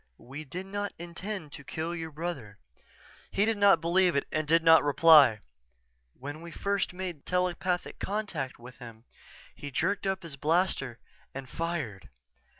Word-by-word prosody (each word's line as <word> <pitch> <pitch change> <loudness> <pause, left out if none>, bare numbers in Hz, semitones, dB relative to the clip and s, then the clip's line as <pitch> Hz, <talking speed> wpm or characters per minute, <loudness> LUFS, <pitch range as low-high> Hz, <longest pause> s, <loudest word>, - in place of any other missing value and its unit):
"We 140 +5 -9
did 180 +7 -6
not 205 +1 -4
intend 175 0 -6
to 140 - -9
kill 160 +4 -4
your 165 -1 -5
brother." 150 -10 -5 0.7
He 200 - +2
did 220 -1 0
not 200 -1 +6
believe 175 +1 +2
it 140 - 0
and 155 -1 -1
did 165 +2 +4
not 160 0 +7
reply. 145 -6 +6 0.8
"_When 145 +3 -6
we 170 - -9
made - - -12
first 200 -2 0 0.3
telepathic 180 0 -1
contact 195 -10 -3
with 125 +2 -13
him, 115 -2 -11 0.5
he 145 - -8
jerked 195 +8 -1
up 190 -1 -1
his 155 -5 -8
blaster 150 -5 0 0.4
and 135 -1 -6
fired. 165 - -4
165 Hz, 150 wpm, -29 LUFS, 140-185 Hz, 0.8 s, not